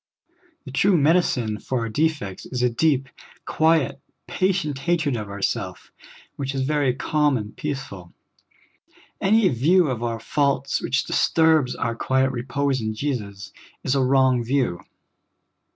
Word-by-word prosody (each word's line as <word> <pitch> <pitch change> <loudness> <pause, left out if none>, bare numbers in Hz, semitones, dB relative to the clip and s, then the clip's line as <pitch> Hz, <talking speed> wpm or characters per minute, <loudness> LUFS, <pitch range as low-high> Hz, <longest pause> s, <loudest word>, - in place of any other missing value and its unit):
The 135 - -8
true 185 +7 +3
medicine 140 -9 +2
for 130 -2 -2
our 115 - -3
defects 145 - -2
is 125 -1 -3
a 125 - +2
deep, 135 +1 +1 0.4
quiet, 160 -4 +2 0.3
patient 180 -7 -1
hatred 155 -2 0
of 105 -3 -5 0.2
self, - - -5 0.5
which 135 0 -3
is 135 - 0
very 140 -3 +1
calm 150 -1 +1
and 105 -2 -7
peaceful. 135 -12 -6 1.1
Any 215 +1 +4
view 155 +7 +3
of 120 -2 -4
our 115 -1 -2
faults 140 +3 0
which 135 +2 0
disturbs 160 -5 +2
our 115 - -2
quiet 130 +3 +1
repose 135 +1 -1
in 110 0 -3
Jesus 105 -7 -4 0.3
is 130 - 0
a 135 - +2
wrong 130 -2 +3
view. 120 -8 0
135 Hz, 135 wpm, -23 LUFS, 120-150 Hz, 1.1 s, Any